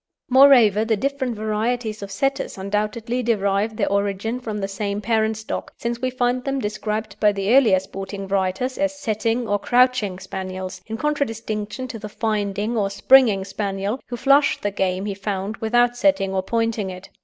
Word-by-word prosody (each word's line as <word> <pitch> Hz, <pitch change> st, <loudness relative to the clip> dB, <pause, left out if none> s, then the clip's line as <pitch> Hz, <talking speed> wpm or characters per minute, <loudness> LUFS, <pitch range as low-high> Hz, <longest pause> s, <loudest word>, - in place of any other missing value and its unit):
Moreover, 250 Hz, -6 st, +6 dB
the 225 Hz, -1 st, +1 dB
different 265 Hz, 0 st, -2 dB
varieties 220 Hz, +1 st, -2 dB
of 200 Hz, -, -6 dB
Setters 270 Hz, +6 st, -2 dB
undoubtedly 215 Hz, +5 st, -2 dB
derive 210 Hz, -2 st, 0 dB
their 200 Hz, -, 0 dB
origin 200 Hz, +4 st, -1 dB
from 220 Hz, -4 st, -5 dB
the 195 Hz, -1 st, -2 dB
same 200 Hz, +1 st, -3 dB
parent 220 Hz, 0 st, 0 dB
stock, 220 Hz, -, -5 dB
since 235 Hz, 0 st, -3 dB
we 255 Hz, -, 0 dB
find 250 Hz, 0 st, 0 dB
them 275 Hz, 0 st, -1 dB
described 215 Hz, -1 st, -3 dB
by 210 Hz, -, +4 dB
the 200 Hz, +4 st, +1 dB
earlier 220 Hz, -9 st, +5 dB
sporting 195 Hz, +1 st, -7 dB
writers 195 Hz, +7 st, -1 dB
as 290 Hz, 0 st, 0 dB
"setting" 225 Hz, 0 st, -1 dB
or 205 Hz, 0 st, +1 dB
"crouching" 245 Hz, -6 st, +2 dB
Spaniels, 185 Hz, 0 st, -6 dB
in 225 Hz, 0 st, -4 dB
contradistinction 230 Hz, -5 st, -2 dB
to 235 Hz, -3 st, -7 dB
the 210 Hz, 0 st, -7 dB
"finding" 210 Hz, 0 st, -2 dB
or 205 Hz, -3 st, +1 dB
"springing" 200 Hz, -1 st, +4 dB
Spaniel, 200 Hz, +3 st, -3 dB
who 240 Hz, -, -5 dB
flushed 280 Hz, +3 st, +3 dB
the 205 Hz, -, 0 dB
game 190 Hz, 0 st, -1 dB
he 205 Hz, -, -2 dB
found 195 Hz, +1 st, -4 dB
without 240 Hz, +2 st, +2 dB
setting 245 Hz, -8 st, +2 dB
or 190 Hz, -, +1 dB
pointing 225 Hz, -1 st, -1 dB
it. 185 Hz, +1 st, -10 dB
215 Hz, 170 wpm, -22 LUFS, 200-245 Hz, -, Moreover